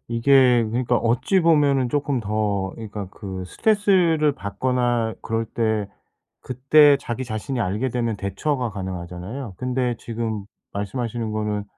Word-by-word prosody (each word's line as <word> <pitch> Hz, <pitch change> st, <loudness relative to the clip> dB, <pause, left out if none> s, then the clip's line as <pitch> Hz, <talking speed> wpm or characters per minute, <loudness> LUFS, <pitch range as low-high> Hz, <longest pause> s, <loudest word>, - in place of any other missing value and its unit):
이게 125 Hz, 0 st, +4 dB
그러니까 120 Hz, +1 st, +1 dB
어찌 125 Hz, -, +2 dB
보면은 145 Hz, -6 st, +3 dB
쪼끔 140 Hz, -1 st, 0 dB
더 105 Hz, -2 st, -1 dB
그러니까 105 Hz, -3 st, -7 dB
그 95 Hz, -3 st, -7 dB
스트레스를 180 Hz, -, +2 dB
받거나 120 Hz, +1 st, -1 dB
그럴 115 Hz, 0 st, -1 dB
때 110 Hz, -2 st, -1 dB, 0.5 s
그때 140 Hz, +3 st, +5 dB
자기 120 Hz, +2 st, -4 dB
자신이 120 Hz, +3 st, -4 dB
알게 105 Hz, +5 st, -1 dB
되면 115 Hz, -2 st, -1 dB
대처가 125 Hz, +6 st, -2 dB
가능하잖아요. 95 Hz, +4 st, -6 dB
근데 125 Hz, -1 st, -1 dB
지금 110 Hz, -3 st, -4 dB, 0.3 s
말씀하시는 110 Hz, +2 st, -3 dB
거는 105 Hz, -1 st, -2 dB
115 Hz, 310 characters per minute, -23 LUFS, 105-130 Hz, 0.5 s, 그때